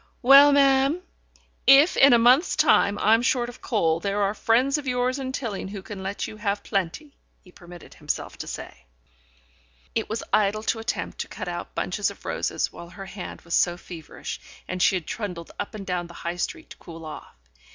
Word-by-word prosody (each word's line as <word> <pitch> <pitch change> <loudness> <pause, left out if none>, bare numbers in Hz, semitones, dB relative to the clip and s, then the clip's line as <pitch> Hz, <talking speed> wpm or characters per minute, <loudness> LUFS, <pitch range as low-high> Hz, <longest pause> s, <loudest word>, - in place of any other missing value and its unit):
"Well, 275 +3 +9
ma'am, 275 +4 +3 0.6
if 280 +5 +7
in 275 - +7
a 240 - +7
month's 250 +8 +4
time 200 0 +4
I'm 225 +2 +4
short 245 -1 +1
of 245 - -13
coal, 165 -7 +1
there 200 +2 -1
are 200 +1 +1
friends 255 +7 +2
of 285 - -9
yours 250 +1 0
in 260 -1 -4
Tilling 230 -8 -4
who 195 -1 -8
can 205 -2 -8
let 195 +1 -3
you 215 - -10
have 205 -1 -2
plenty," 200 - -3 0.2
he 180 - -19
permitted 175 -1 -13
himself - - -4
to - - -6
say.... - - -9 1.1
It - - -2
was 220 +1 -3
idle 215 +1 +2
to 225 - -1
attempt 225 +2 -4
to - - -3
cut - - -7
out - - -6
bunches - - -1
of - - -13
roses - - -2
while 170 - -10
her 195 +2 -9
hand 190 -1 -8
was 170 - -8
so 175 -1 +2
feverish, 165 -4 -8 0.3
and 185 0 -4
she 190 0 +4
trundled 175 -1 -6
up 205 - -5
and 200 -2 -7
down 180 -2 -2
the 170 - -14
High 170 +1 -2
Street 320 - -4
to - - -11
cool 165 -1 -11
off. 155 - -10
210 Hz, 195 wpm, -25 LUFS, 180-255 Hz, 1.1 s, Well